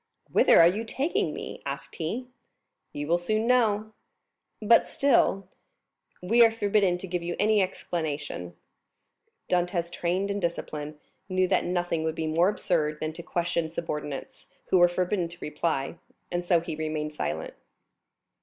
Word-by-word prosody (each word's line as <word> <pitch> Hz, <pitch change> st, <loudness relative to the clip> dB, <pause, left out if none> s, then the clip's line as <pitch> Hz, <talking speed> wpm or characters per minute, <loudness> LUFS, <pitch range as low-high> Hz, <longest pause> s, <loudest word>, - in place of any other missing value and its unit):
"Whither -, -, +6 dB
are 165 Hz, -, +9 dB
you 205 Hz, +6 st, 0 dB
taking 270 Hz, +8 st, -1 dB
me?" -, -, -7 dB
asked -, -, -6 dB
he. 200 Hz, +10 st, -3 dB, 0.7 s
"You 145 Hz, -, -4 dB
will 170 Hz, +3 st, +2 dB
soon 215 Hz, +5 st, 0 dB
know." 220 Hz, -3 st, +2 dB, 0.7 s
"But 225 Hz, +2 st, +5 dB
still——" 230 Hz, -8 st, +2 dB, 0.8 s
"We 230 Hz, +6 st, +5 dB
are 230 Hz, -, +7 dB
forbidden 205 Hz, -4 st, +1 dB
to 190 Hz, -, -7 dB
give 175 Hz, -1 st, -2 dB
you 170 Hz, 0 st, -3 dB
any 210 Hz, 0 st, +3 dB
explanation." 150 Hz, -, -3 dB, 0.9 s
Dantès, 175 Hz, -1 st, 0 dB
trained 185 Hz, +4 st, -1 dB
in 200 Hz, -, -2 dB
discipline, 155 Hz, -4 st, -4 dB, 0.3 s
knew 185 Hz, 0 st, +2 dB
that 190 Hz, -, +2 dB
nothing 175 Hz, -2 st, -1 dB
would 160 Hz, 0 st, -1 dB
be 160 Hz, -, -2 dB
more 165 Hz, +4 st, +3 dB
absurd 155 Hz, -7 st, 0 dB
than 155 Hz, 0 st, -3 dB
to 170 Hz, -, -7 dB
question 170 Hz, -1 st, -1 dB
subordinates, 150 Hz, -4 st, -5 dB, 0.2 s
who 185 Hz, -, +5 dB
were 175 Hz, -, +7 dB
forbidden 180 Hz, +1 st, -1 dB
to 170 Hz, +1 st, -12 dB
reply; 150 Hz, -1 st, -2 dB, 0.3 s
and 175 Hz, 0 st, -1 dB
so 175 Hz, -1 st, +3 dB
he 165 Hz, -, -5 dB
remained 155 Hz, -1 st, -3 dB
silent. 80 Hz, -, -3 dB
175 Hz, 150 wpm, -27 LUFS, 160-200 Hz, 0.9 s, are